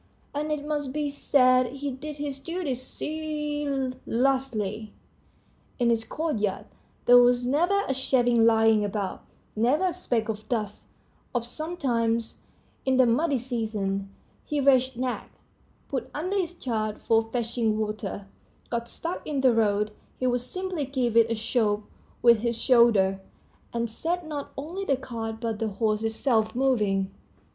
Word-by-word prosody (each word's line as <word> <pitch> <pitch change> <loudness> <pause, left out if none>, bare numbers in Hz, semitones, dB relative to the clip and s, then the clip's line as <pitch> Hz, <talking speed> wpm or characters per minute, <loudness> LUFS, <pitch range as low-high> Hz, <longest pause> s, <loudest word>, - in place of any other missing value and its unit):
And 300 +1 -2
it 295 -1 -2
must 295 -3 -2
be 300 -1 -1
said 255 -3 +4
he 280 0 -3
did 290 +3 -7
his 285 -2 -4
duty 335 -1 -3
zealously. 270 -6 -2 0.8
In 240 -2 +2
his 225 -1 +1
courtyard 225 -12 -2 0.4
there 245 0 +9
was 245 0 +4
never 350 +10 +2
a 270 - +1
shaving 245 -3 +3
lying 225 -1 +5
about, 200 -1 -3 0.3
never 250 +11 +2
a - - -4
speck 240 -11 -1
of 215 -1 -5
dust; 210 -4 -3 0.5
if 240 -1 0
sometimes, 240 -6 -1 0.4
in 265 -1 +2
the 260 - +6
muddy 275 +5 +2
season, 215 -5 -2 0.4
the 295 - 0
wretched 260 -2 +4
nag, 255 -1 -2 0.6
put - - -3
under 360 +7 -2
his 355 -3 -1
charge 215 -6 -2
for 225 0 +3
fetching 230 -2 0
water, 210 -2 -3 0.5
got 235 0 -2
stuck 335 +2 -4
in 285 -3 -1
the 260 -2 +5
road, 210 -1 +2 0.3
he 255 - -1
would 245 -1 +2
simply 365 +3 -3
give 255 -4 -1
it 230 -1 +6
a 230 - 0
shove 215 -2 0 0.4
with 235 -2 +7
his 235 0 -1
shoulder, 215 -7 +4 0.5
and 235 0 -1
set 335 +10 -2
not 295 -2 -5
only 335 +8 -4
the 275 -8 +1
cart 225 -4 -5
but 225 -2 -3
the 225 - 0
horse 215 +1 0
itself 225 0 +1
moving. 210 -7 +1
245 Hz, 145 wpm, -27 LUFS, 225-285 Hz, 0.8 s, there